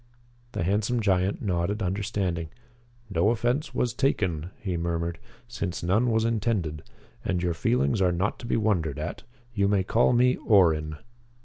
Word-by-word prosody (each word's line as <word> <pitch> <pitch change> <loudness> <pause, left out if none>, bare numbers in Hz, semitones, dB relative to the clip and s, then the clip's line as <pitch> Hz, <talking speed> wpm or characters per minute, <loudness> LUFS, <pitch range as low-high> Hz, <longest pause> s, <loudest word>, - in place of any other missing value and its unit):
The 100 - -1
handsome 105 +6 +1
giant 95 -2 +1
nodded 100 +2 -1
understanding. 90 -3 -2 0.6
"No 100 0 +2
offense 120 +5 0
was 120 -3 0
taken," 90 - 0
he 95 -4 -3
murmured, 85 0 -2 0.3
"since 100 -9 -4
none 105 +8 +2
was 110 0 +2
intended. 105 -9 -1 0.4
And 90 -2 -1
your 85 -1 +1
feelings 70 +3 +1
are 90 -1 +4
not 95 +5 -1
to 120 - -7
be - - +1
wondered 90 -10 0
at. - - -5 0.3
You 100 -3 +2
may 100 -2 +2
call 115 +6 +3
me 125 +1 +3
Orrin." 80 -7 +3
95 Hz, 150 wpm, -26 LUFS, 85-110 Hz, 0.6 s, are